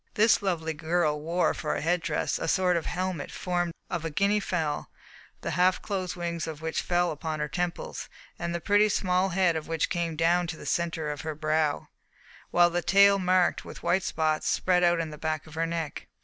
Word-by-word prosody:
This 220 0 +4
lovely 165 -5 -1
girl 160 -1 0
wore 170 +3 +1
for 150 - -2
head 175 +2 +1
dress 160 -2 -1
a - - -3
sort 185 -2 +2
of 170 - -2
helmet 185 -4 -3
formed 175 -1 -2 0.2
of 175 -3 -3
a 165 - -2
Guinea 200 +6 +2
fowl, 160 -7 -2 0.5
the - - -3
half 180 +1 +3
closed 185 -3 -3
wings 170 -2 -3
of 155 -2 -6
which 160 0 -2
fell 175 0 +1
upon 155 0 -4
her 150 - -1
temples, 175 +4 -4 0.3
and 170 - -2
the - - -1
pretty, 205 +5 +3
small 185 -1 +1
head 180 -2 +2
of 160 -1 -4
which 165 -1 -1
came 170 -2 -1
down 170 +2 +2
to 165 -1 -5
the - - -10
centre 165 -3 -1
of 145 - -6
her 155 -1 -4
brow, 155 -1 0 0.6
while 175 0 +4
the 175 +1 0
tail, 200 +2 +5
marked 185 -1 +2
with - - -10
white 190 - +2
spots, 155 -3 0
spread 180 -1 +2
out 175 -1 +4
on 160 -1 -3
the 150 - -10
back 155 -1 -2
of 155 - -14
her 165 +1 -1
neck. 165 -2 -4
170 Hz, 205 wpm, -27 LUFS, 160-180 Hz, 0.6 s, tail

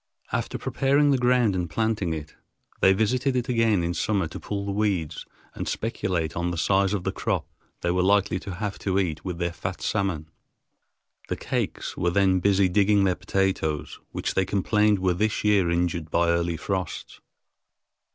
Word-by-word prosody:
After - - -2
preparing 140 +2 +2
the 135 - +3
ground, 125 -4 +3
and 90 -2 -2
planting 105 0 0
it, 75 -1 -5 0.5
they 95 - +6
visited 125 +7 +1
it 125 -1 0
again 115 -6 +2
in 85 +1 -1
summer 95 +1 0
to - - -7
pull 100 -1 -4
the 100 - -2
weeds 100 -7 -1 0.3
and - - -5
speculate 90 -8 -2
on 85 +1 -1
the 85 - -3
size 95 +4 +2
of 95 - -3
the - - -1
crop - - -2 0.3
they 85 - 0
were 90 +1 +1
likely 95 -1 +2
to 95 0 -7
have 105 0 -4
to 95 -1 -1
eat 85 -6 -1
with 90 -3 -4
their 85 -1 -2
fat 90 +1 -5
salmon. 95 -7 -1 1.0
The - - -2
Kakes - - -3
were 85 - +1
then 95 0 +3
busy 100 0 +3
digging 100 +2 +3
their 95 -1 +3
potatoes, 90 -7 -1
which - - -2
they 95 - +2
complained 105 +2 +2
were 95 -1 +1
this 105 +4 0
year 100 -4 +3
injured 85 -2 -1
by 85 +1 +2
early 85 0 +1
frosts. 95 0 -4
95 Hz, 180 wpm, -25 LUFS, 85-105 Hz, 1.0 s, they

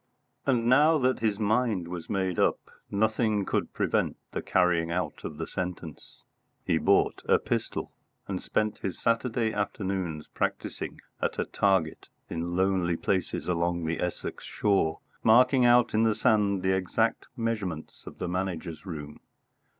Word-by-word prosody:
And 120 -4 +2
now 150 +6 +5
that 130 -2 +1
his 110 -3 +1
mind 110 -4 +1
was 85 -1 -7
made 95 -3 -1
up, - - +3 0.3
nothing 110 0 +1
could - - -1
prevent - - 0
the - - -3
carrying 90 -2 +2
out 90 +2 -3
of 75 - -6
the 80 - -3
sentence. 90 -4 -6 0.4
He - - +2
bought - - +3
a - - +5
pistol, - - -3 0.4
and 95 -2 -3
spent 110 0 -1
his 95 - -4
Saturday 115 -1 +1
afternoons 95 -6 -2
practising - - -3 0.2
at - - -1
a - - 0
target 95 -5 0 0.2
in 85 +1 -3
lonely 95 -2 +1
places 95 +1 -1
along 85 -1 0
the 80 0 -1
Essex 90 -1 -4
shore, 95 -6 +1 0.2
marking 125 +3 +5
out 120 0 +5
in 110 - +3
the 110 -1 +3
sand 105 -3 +2
the 95 0 +3
exact 95 -1 0
measurements 105 -9 -3
of - - -9
the 90 - -3
Manager's 90 -1 -3
room. 75 -4 -7
95 Hz, 150 wpm, -28 LUFS, 85-110 Hz, 0.4 s, now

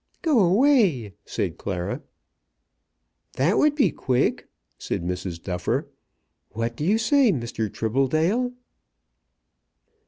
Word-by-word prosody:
"Go 310 -8 +3
away," 190 - +3
said - - -3
Clara. 90 -3 -3 1.3
"That 160 +10 +2
would 300 -1 +3
be 285 - +3
quick," 125 -2 0 0.3
said - - -3
Mrs. 90 -1 -4
Duffer. 90 0 -2 0.6
"What 115 +1 -2
do 145 - -5
you 200 +7 +3
say, 235 +2 +4
Mr. 115 - -3
Tribbledale?" 155 - +1
140 Hz, 100 wpm, -24 LUFS, -, 1.3 s, say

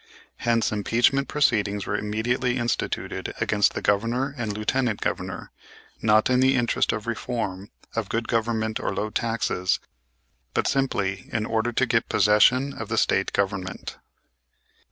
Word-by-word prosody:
Hence, 115 -1 +1
impeachment 120 +6 +2
proceedings 105 -9 +1
were 100 - -2
immediately 120 +4 0
instituted 120 -1 -2
against 105 -1 +2
the - - -4
Governor 120 +7 +1
and 120 -5 -3
Lieutenant 110 +2 0
Governor, - - -4 0.5
not 110 0 +4
in 125 0 +3
the 130 +1 +4
interest 120 -2 +1
of 105 - -4
reform, 110 -4 -3 0.3
of 115 -3 -2
good 115 0 -1
government 110 -1 0
or - - -4
of 95 - -4
low 110 - -1
taxes, 115 -6 0 0.8
but - - +1
simply 100 -9 -1
in 110 -1 -1
order 115 +1 0
to 130 - +2
get 115 -1 +1
possession 105 +7 +4
of - - -7
the - - -1
State - - +2
Government. 95 -2 -2
115 Hz, 145 wpm, -25 LUFS, 105-120 Hz, 0.8 s, not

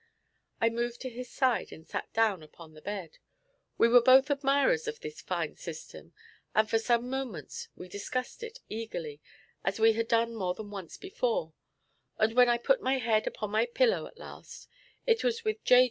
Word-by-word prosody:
I 230 - +4
moved 235 +1 -2
to 255 - -5
his 250 +1 -7
side 260 -3 +1
and 160 - -11
sat - - -5
down 220 -6 +2
upon 155 +1 -14
the 155 - -14
bed. 195 -4 -6 0.6
We - - +6
were 245 +1 +7
both 265 +4 +6
admirers 285 - +2
of 450 +1 -4
this 455 0 -8
fine - - -3
system, - - -9 0.4
and 215 0 +4
for 225 - +2
some 235 +1 +1
moments 250 - -5
we 180 - -9
discussed 250 - -4
it 465 +2 -8
eagerly, 170 -10 -5 0.4
as 195 +2 -1
we 225 0 +6
had 230 +1 -1
done 230 0 +2
more 185 -5 -2
than 210 -1 -8
once 195 -5 -7
before; 480 +5 -2 0.6
and 220 +1 +2
when 250 0 +6
I 240 - +4
put - - +2
my 265 -4 +1
head 225 -3 +1
upon 215 -1 -4
my 220 +3 +2
pillow 460 - +2
at - - -17
last, - - -11 0.4
it 460 -1 +3
was 465 -2 0
with 435 0 -1
J. 250 - +7
235 Hz, 190 wpm, -30 LUFS, 215-275 Hz, 0.6 s, were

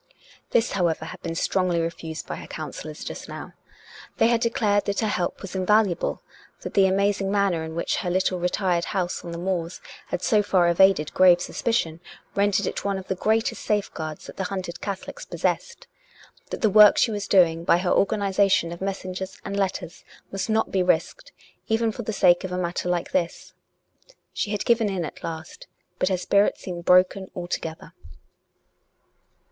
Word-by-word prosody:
This, 235 0 +2
however, 170 -4 0
had - - -9
been 165 - -4
strongly 180 0 +1
refused 165 -1 -4
by - - -5
her - - -9
coun - - -6
sellors - - -8
just - - -7
now. - - -8 0.6
They 225 - +4
had 235 -1 +2
declared 210 -3 +1
that 200 +2 -1
her 220 - +1
help 180 -3 -2
was 195 - -7
invaluable; 195 0 +1 0.4
that - - -6
the 195 -1 +5
amazing 195 0 +1
manner 200 -5 +1
in 160 0 -6
which 170 - -1
her 180 - -2
little 185 0 +1
retired 180 -1 0
house 180 -3 -2
on 170 - -7
the 170 - -5
moors 175 -1 -3 0.3
had 180 - -3
so 210 -2 +4
far 185 -4 +3
evaded 170 -3 +4
grave 180 -2 +6
suspi 225 +5 -2
cion 165 -6 -1 0.3
rendered 200 0 +2
it - - -3
one 200 -1 -1
of 190 - -9
the - - +2
greatest 220 +4 0
safeguards 160 -7 -2
that - - -11
the 190 - -2
hunted 180 -2 -5
Catholics 200 -2 -5
possessed; 480 +1 -3 0.6
that - - -5
the 220 - +4
work 210 0 +8
she 230 - +3
was 205 -1 -3
doing 165 -4 +4
by 170 - +4
her 180 0 -1
organization 195 -4 +2
of 170 - -8
messengers 190 -1 -4
and 200 - -4
letters 190 -3 -3 0.3
must 195 +2 -3
not 220 0 +1
be 190 - +2
risked, 180 - 0 0.4
even 225 0 +1
for 240 - -6
the 220 - -3
sake 175 -3 +4
of 190 - -4
a 180 - -2
matter 180 0 -2
like 175 -1 -1
this.... 170 -2 -2 0.8
She - - -2
had 210 -1 -2
given 230 -3 +3
in 185 -4 -2
at - - -9
last. 160 0 -7 0.3
But 185 - +2
her 185 - +1
spirit 200 +3 +2
seemed 175 -2 -7
broken 185 +1 +4
altogether. 175 -2 -5
190 Hz, 185 wpm, -24 LUFS, 175-205 Hz, 0.8 s, work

